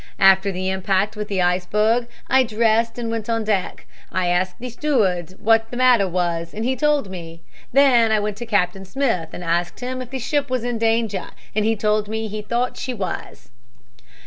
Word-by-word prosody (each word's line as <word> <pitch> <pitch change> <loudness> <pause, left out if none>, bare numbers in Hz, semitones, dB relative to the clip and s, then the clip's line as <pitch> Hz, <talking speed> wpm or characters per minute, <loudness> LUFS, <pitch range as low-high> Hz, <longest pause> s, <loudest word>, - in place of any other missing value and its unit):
After 195 +1 +5
the 185 0 -3
impact 190 +2 0
with 210 0 -4
the 195 -3 0
iceberg 210 +7 +1 0.2
I 265 - +5
dressed 230 0 +1
and 230 -2 -3
went 225 -1 -4
on 225 -1 0
deck. 205 -4 -2 0.3
I 185 -1 0
asked 180 +1 0
the 250 0 -7
steward 195 - 0
what 225 0 +3
the 245 - -6
matter 250 -6 +4
was 170 -1 -2
and 220 +2 -3
he 260 +1 +1
told 290 -6 +1
me. 165 -2 -9 0.3
Then 245 -4 +5
I 215 - +3
went 205 0 -3
to 240 - -6
Captain 195 -3 0
Smith 195 - -1
and 180 - -7
asked 175 +1 -1
him 255 +1 -4
if 250 - -7
the 265 - -4
ship 280 +2 -1
was 255 -2 -1
in 240 -2 -2
danger 225 -4 0 0.3
and 215 0 +1
he 225 +1 +2
told 210 0 +1
me 220 +1 -3
he 215 0 -5
thought 240 +4 -2
she 255 -1 -4
was." 185 - -6
215 Hz, 200 wpm, -21 LUFS, 185-240 Hz, 0.3 s, After